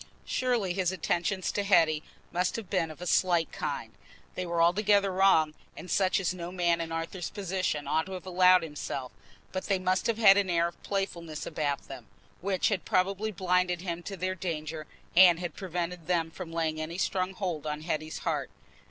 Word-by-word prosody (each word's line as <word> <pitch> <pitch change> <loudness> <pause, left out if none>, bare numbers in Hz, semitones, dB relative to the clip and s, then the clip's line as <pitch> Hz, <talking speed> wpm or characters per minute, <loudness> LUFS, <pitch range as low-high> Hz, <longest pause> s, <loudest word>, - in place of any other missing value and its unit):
Surely 240 -8 0
his 185 -1 0
attentions 185 +1 -1
to 205 - -1
Hetty 165 -6 +4 0.3
must 180 +1 0
have 215 -5 -6
been 180 -5 +1
of 155 +3 -9
a - - -5
slight 175 -2 +2
kind; - - -4 0.4
they 185 -1 -4
were 170 0 -1
altogether 200 +3 +4
wrong, 185 -5 +4 0.2
and 180 - -8
such 190 -1 +3
as 185 -1 0
no 175 -1 -6
man 170 -2 +1
in 165 0 -5
Arthur's 165 +2 -4
position 185 -6 -2
ought 160 +3 +1
to 190 - -7
have 185 -2 -7
allowed 185 -1 +5
himself, 145 -4 -5 0.4
but 185 - -4
they 195 - +2
must 185 0 0
have 230 -2 +1
had 200 -3 +7
an 200 -2 +1
air 170 -1 +2
of 170 - -20
playfulness 170 -6 -3
about 145 -3 -2
them, - - -9 0.3
which 190 0 +1
had 200 -4 -1
probably 195 +4 0
blinded 180 -2 +1
him 175 -2 -4
to 195 +2 -7
their 185 +2 -1
danger 160 -4 -4 0.3
and 175 -2 +8
had 175 -3 -4
prevented 175 -3 -4
them 165 -2 +1
from 170 0 -8
laying 160 -1 -1
any 165 +2 -5
strong 185 0 -1
hold 170 -6 -3
on 150 0 -3
Hetty's 155 -1 -3
heart. - - -1
180 Hz, 190 wpm, -29 LUFS, 165-190 Hz, 0.4 s, and